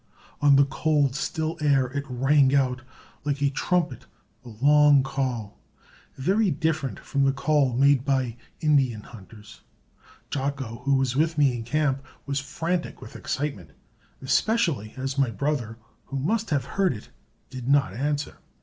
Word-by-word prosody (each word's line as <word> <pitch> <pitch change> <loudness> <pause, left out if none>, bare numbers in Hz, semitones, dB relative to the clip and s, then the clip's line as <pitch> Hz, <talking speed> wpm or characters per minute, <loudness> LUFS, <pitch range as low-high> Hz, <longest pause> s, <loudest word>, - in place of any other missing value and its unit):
On 145 -1 +6
the 140 0 +6
cold, 145 -1 +1
still 160 +3 -2
air 140 -3 +3
it 140 0 -3
rang 135 +2 +3
out 130 -2 +1 0.4
like 145 -1 -1
a 140 -1 +1
trumpet 145 -5 -1 0.4
a 125 - -11
long 145 +4 +5
call, 130 -6 -3 0.6
very 195 +10 +2
different 155 -2 -1
from 140 -1 -1
the 135 - +4
call 140 -1 +1
made 140 0 +4
by 130 -4 0 0.3
Indian 135 -8 +2
hunters. 105 -1 -14 0.7
Jocko, 135 -4 -3
who 140 0 +3
was 130 -2 0
with 160 +3 +1
me 140 -4 +3
in 120 - -4
camp, 135 +2 0 0.2
was 140 0 -1
frantic 165 +5 -3
with - - -12
excitement, 105 - -4 0.5
especially 140 - +1
as 135 +1 -3
my 135 -3 +3
brother, 115 0 -2 0.3
who 135 - -5
must 210 +11 -1
have 140 -5 0
heard 190 +3 +1
it, 105 - -12 0.4
did 125 -2 -7
not 140 -1 +3
answer. 145 +3 -2
140 Hz, 150 wpm, -25 LUFS, 130-150 Hz, 0.7 s, On